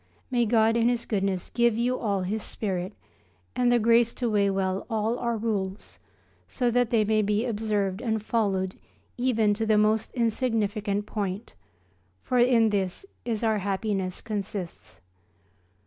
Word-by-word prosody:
May 240 -2 +2
God 225 0 +3
in 235 0 +3
His 240 -1 -1
goodness 195 -4 -1
give 235 -2 +3
you 245 +2 +1
all 200 -4 -1
His 210 +4 -2
spirit, 190 -3 -3 0.6
and 245 -1 +3
the 245 - +5
grace 235 +1 +3
to 240 -3 -1
weigh 200 -1 +3
well 190 -1 -1
all 220 +2 0
our 235 -1 -1
Rules, 205 -3 -3 0.5
so 245 -2 0
that 245 -1 +2
they 230 -2 +3
may 215 +1 +2
be 210 +2 0
observed 210 -3 -1
and 220 -3 0
followed 200 -4 0 0.4
even 225 -4 +2
to 220 +2 -2
the 215 -1 +4
most 215 +1 +2
insignificant 215 -4 0
point, 205 -1 -4 0.7
for 250 - +1
in 235 -3 +4
this 195 - -2 0.4
our 220 -2 +2
happiness 195 -1 -2
consists. 190 - -6
215 Hz, 145 wpm, -26 LUFS, 200-235 Hz, 0.7 s, the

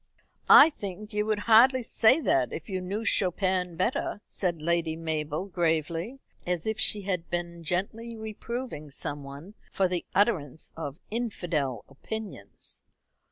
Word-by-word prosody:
"I 325 - +10
think 210 -3 -7
you 210 0 0
would 215 -1 0
hardly 245 +3 +6
say 225 +5 +4
that 130 - +2
if 160 - -6
you 190 -2 -3
knew 200 +5 -3
Chopin 185 -2 +1
better," 215 - -1
said 175 -4 -2
Lady 165 0 0
Mabel 155 0 -2
gravely, 170 - -1 0.3
as 175 -2 -2
if 220 0 -2
she 205 -1 +3
had 180 -5 -2
been 170 0 -4
gently 210 +7 -2
reproving 220 - -6
some 145 0 -5
one 140 +8 -10 0.2
for 190 - +2
the 180 -1 -2
utterance 170 - +1
of 145 -3 -5
infidel 170 - -2
opinions. 215 +10 -5
180 Hz, 140 wpm, -28 LUFS, 160-215 Hz, 0.3 s, I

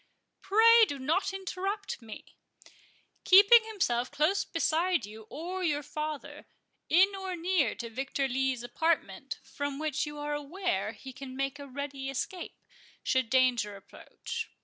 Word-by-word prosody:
"Pray 455 +3 +6
do 285 - -4
not 315 +10 0
interrupt 385 -1 -4
me—Keeping 400 - +2
himself 250 - -1
close 315 +7 +1
beside 335 - 0
you 215 +1 -12
or 360 +5 -5
your 295 -3 0
father, 305 0 -6 0.4
in 385 +4 +5
or 380 -1 -4
near 340 - +1
to 235 - -6
Victor 270 +4 -2
Lee's 260 -1 -1
apartment, 320 +8 -1
from 285 -1 -4
which 305 0 -1
you 295 0 -7
are 295 0 -3
aware 295 - -2
he 265 +4 -10
can 260 0 -9
make 275 +1 -2
a 285 - -8
ready 275 0 -5
escape, 345 +7 -4 0.5
should 260 -3 +1
danger 245 -5 +2
approach. 195 - -8
295 Hz, 135 wpm, -30 LUFS, 260-370 Hz, 0.5 s, Pray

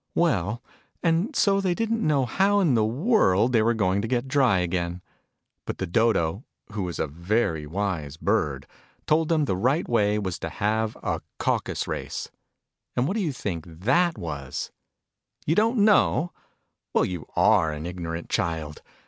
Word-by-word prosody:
Well, 115 - +1 0.4
and 175 - +1
so 195 -2 +3
they 185 -2 0
didn't 225 +1 -1
know 145 - +2
how 195 - +2
in 170 -9 +3
the 110 -2 +3
world 125 - +2
they 115 - +5
were 115 +2 +2
to 100 0 +1
get 125 +2 -1
dry 130 -7 +3
again. 90 0 -2 0.6
But - - -3
the 95 - -2
Dodo 95 0 +1 0.3
who 105 -1 -3
was 90 -3 -3
a - - 0
very 85 0 -1
wise 80 -5 -3
bird 70 -4 0 0.4
told 155 +1 +2
them 155 -3 +2
the 95 - 0
right 130 - +1
w 120 - +1
T 105 0 +2
ay - - +1
was 95 -5 -3
to 80 - -4
have 110 +4 -1
a - - -1 0.2
Caucus - - -1
Race. - - -4 0.6
And 125 +2 +1
what 190 - 0
do 225 - 0
you 165 -6 0
think 95 - -4
that 130 - +1
Avas? 70 -6 -5 0.7
You 155 - +2
don't 225 +6 +2
knoic? 175 -5 +3 0.6
Well, - - +4
you 90 -4 -5
are 80 -1 +4
an 75 +1 -6
ignorant 85 -1 -5
child 80 -3 -2
110 Hz, 170 wpm, -25 LUFS, -, 0.7 s, they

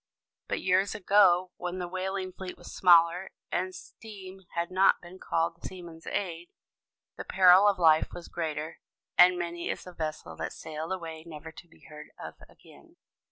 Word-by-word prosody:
But - - -3
years 190 +2 +2
ago, 185 -2 +4
when 180 0 -4
the 180 -1 -4
whaling 185 +1 -4
fleet 185 -1 -8
was - - -11
smaller, 175 +1 +5 0.2
and 185 +1 -2
steam 195 -3 -11 0.2
had 170 +1 -2
not 190 +1 +4
been 180 +2 -13
called 165 +1 0
to - - -33
the - - -5
seaman's 170 -3 -11
aid, 175 -3 -3 0.7
the - - -5
peril 185 +1 +6
of 200 -2 +3
life 160 -3 +4
was 175 - -9
greater; 160 -1 -4 0.4
and 180 0 +7
many 170 0 -4
is - - -3
the 180 - -11
vessel 155 -2 -5
that - - -4
sailed 160 +2 -7
away 165 -4 -5
never 160 -1 -10
to 175 - -14
be 165 - -23
heard 150 0 -12
of - - -10
again. - - -19
175 Hz, 175 wpm, -29 LUFS, 165-185 Hz, 0.7 s, and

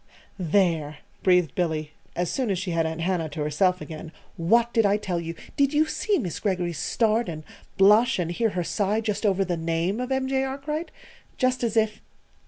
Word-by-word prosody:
"There!" 165 -4 +1 0.2
breathed 180 -3 +3
Billy, 155 -4 -1 0.2
as 175 -1 -1
soon 255 -4 -1
as 195 - +1
she 185 0 -3
had 165 -1 +1
Aunt 160 +1 -4
Hannah 170 -2 0
to 150 +1 -5
herself 180 +5 +1
again. 160 0 -8 0.2
"What 230 +8 +2
did 225 - +4
I 200 0 +3
tell 185 -4 -2
you? 165 0 -5 0.2
Did 280 0 +2
you 305 +1 +4
see 405 +5 0
Miss 180 - -3
Greggory's 180 -6 -1
start 225 +2 +1
and 155 -2 -6 0.3
blush 215 +5 +5
and 175 -2 -1
hear 225 +6 +1
her 180 -3 -2
sigh 205 +4 0
just 215 -1 -1
over 195 -1 +2
the 175 -2 -1
name 165 +5 -1
of 250 +1 -3
M. 265 0 0
J. 265 0 +1
Arkwright? 280 +5 -3 0.5
Just 255 -1 +1
as 230 -1 0
if 215 -1 +1
190 Hz, 195 wpm, -25 LUFS, 165-230 Hz, 0.5 s, blush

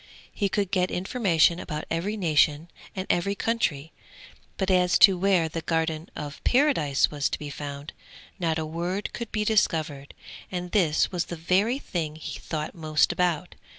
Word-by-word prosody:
He 200 - 0
could 200 -1 -1
get 185 -2 +1
information 180 -4 +2
about 150 -2 -5
every 195 +6 -1
nation 155 -2 +2 0.2
and 185 -1 -3
every 200 +3 +1
country; 160 -10 -1 0.6
but 190 -1 0
as 180 -1 +4
to 195 -2 +7
where 180 -2 +2
the 165 +1 -5
Garden 160 0 -1
of 145 -1 -7
Paradise 245 - +3
was 145 -1 0
to - - -2
be 150 -1 -7
found, 145 +1 -7 0.5
not 165 -3 0
a 160 - -2
word 175 +5 -3
could 235 - -5
he 215 0 -1
discover, 155 -10 +1 0.4
and 180 -1 -4
this 165 -7 +2
was 180 -2 -1
the 175 - -6
very 190 +9 +1
thing 160 - -4
he 160 - -7
thought 155 -2 -4
most 155 -1 +1
about. 175 -1 -1
170 Hz, 165 wpm, -26 LUFS, 155-190 Hz, 0.6 s, to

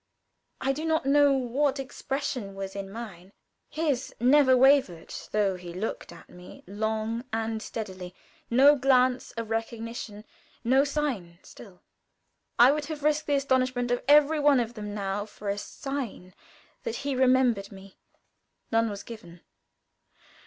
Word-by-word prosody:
I 270 +1 0
do 305 +3 -5
not 320 -3 0
know 285 +1 +5
what 270 +2 0
expression 265 -6 -4
was 195 0 -6
in 195 -1 -5
mine. 200 -4 -9 0.4
His 290 -5 -2
never 260 +1 +5
wavered, 260 - +3 0.2
though 200 -3 +1
he 175 -1 -9
looked 205 -1 -4
at 170 - -14
me 180 0 -14
long 220 +3 -2
and 225 0 -2
steadily 185 -5 -7 0.3
no 275 +5 +6
glance 255 -2 +2
of 230 -1 -6
recognition 225 -1 -5 0.4
no 260 +3 +4
sign 275 - -3
still. 190 -5 -15 0.7
I 245 +3 +7
would 300 0 -2
have 300 -1 -6
risked 305 0 +1
the 290 - +2
astonishment 255 -3 0
of 245 - 0
every 300 +1 +5
one 290 -2 +4
of 235 -1 -2
them 210 -2 -6
now, 200 0 -3
for 205 -1 -7
a 200 - -1
sign 245 -9 -6 0.5
that 465 -2 -4
he 285 - 0
remembered 255 -5 +2
me. 195 -1 -14 0.7
None 225 0 +2
was 200 -1 -6
given. 175 -7 -11
235 Hz, 145 wpm, -27 LUFS, 205-275 Hz, 0.7 s, I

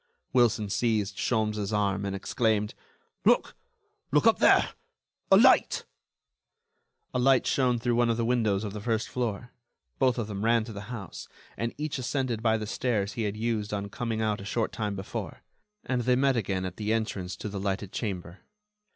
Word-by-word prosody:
Wilson 115 -4 +3
seized 105 -2 0
Sholmes' 105 -3 0
arm, 100 -1 0
and 100 0 -2
exclaimed: 105 +1 0 0.5
"Look!... - - +3 0.6
Look - - +3
up - - +5
there!... - - +5 0.6
A - - +9
light...." - - +5 1.3
A 125 - 0
light 130 +1 +4
shone 125 -3 +2
through 120 +1 0
one 120 0 +3
of 115 - +1
the 115 - 0
windows 110 -4 +1
of 105 -2 -4
the 105 - -6
first 110 0 -1
floor. 120 -1 -3 0.5
Both 130 -2 +3
of 120 - -1
them 100 -1 -5
ran 115 0 +3
to 110 0 -8
the 100 +1 -8
house, 110 -8 -7 0.3
and 115 0 -2
each 150 -2 -3
ascended 130 -3 -1
by 110 -1 +3
the 110 - -4
stairs 105 -3 -1
he 115 0 -2
had 105 0 -3
used 110 -2 -1
on 100 0 -4
coming 110 0 -2
out 105 -2 0
a - - -8
short 110 +3 -1
time 105 -2 -3
before, 95 +1 -6 0.4
and 125 -1 0
they 125 +1 +3
met 135 +1 +3
again 95 -4 -1
at 90 -1 -6
the 105 0 -2
entrance 100 -5 -2
to - - -6
the 100 -1 -4
lighted 100 0 -2
chamber. 90 -4 -4
110 Hz, 185 wpm, -28 LUFS, 100-120 Hz, 1.3 s, A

